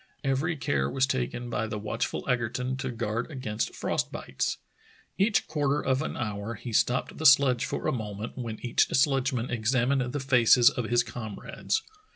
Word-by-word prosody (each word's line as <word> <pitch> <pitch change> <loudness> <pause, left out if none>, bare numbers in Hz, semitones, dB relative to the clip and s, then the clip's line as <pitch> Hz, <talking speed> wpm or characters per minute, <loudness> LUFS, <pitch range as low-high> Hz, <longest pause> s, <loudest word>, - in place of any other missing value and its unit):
Every 145 +5 0
care 70 - 0
was 130 - +2
taken 70 - -2
by 110 - -1
the 105 -1 -4
watchful 105 0 -3
Egerton 125 +1 -1
to 130 0 -3
guard 115 +1 -3
against 130 -7 -3
frost - - -1
bites. - - -3 0.6
Each 200 -1 +3
quarter 145 -2 0
of 130 -1 0
an 160 - -4
hour 110 -2 -3
he 115 +2 -7
stopped 125 +4 +1
the 160 - -4
sledge 135 -3 +5
for - - -4
a - - +2
moment, 110 -2 -5
when 115 -4 -5
each 120 - +3
sledgeman 130 -2 +1
examined 125 +2 +1
the 145 - -2
faces 125 -2 +5
of 125 - -3
his 120 +1 +2
comrades. 120 - -4
125 Hz, 170 wpm, -28 LUFS, 110-135 Hz, 0.6 s, sledge